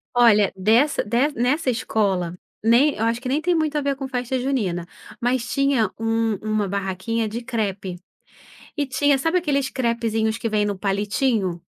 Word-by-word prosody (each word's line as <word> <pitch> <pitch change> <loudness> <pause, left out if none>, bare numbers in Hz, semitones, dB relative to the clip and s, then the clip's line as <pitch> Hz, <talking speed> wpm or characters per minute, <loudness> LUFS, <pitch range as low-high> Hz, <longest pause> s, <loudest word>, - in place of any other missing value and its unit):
Olha, 210 -5 +5
dessa 225 +10 +3
dessa 240 +5 0
nessa 270 +4 +1
escola, 200 -8 0 0.3
nem 245 +7 +4
eu 220 - -2
acho 230 +1 0
que 255 - -4
nem 290 +4 +1
tem 355 +2 +1
muito 310 -2 0
a 295 - +1
ver 280 -1 0
com 270 0 -5
festa 250 0 -2
junina, 200 -10 -1 0.3
mas 245 0 0
tinha 275 -7 +2
um 225 -1 0
uma 215 -2 -1
barraquinha 200 +4 -2
de 225 +3 -5
crepe. 200 -6 -3 0.8
E 290 - +1
tinha 275 +1 +2
sabe 325 +6 +1
aqueles 280 -5 0
crepezinhos 230 -3 0
que 230 - -3
vêm 210 -1 +1
no 205 -1 -2
palitinho? 200 -2 0
230 Hz, 170 wpm, -22 LUFS, 210-270 Hz, 0.8 s, Olha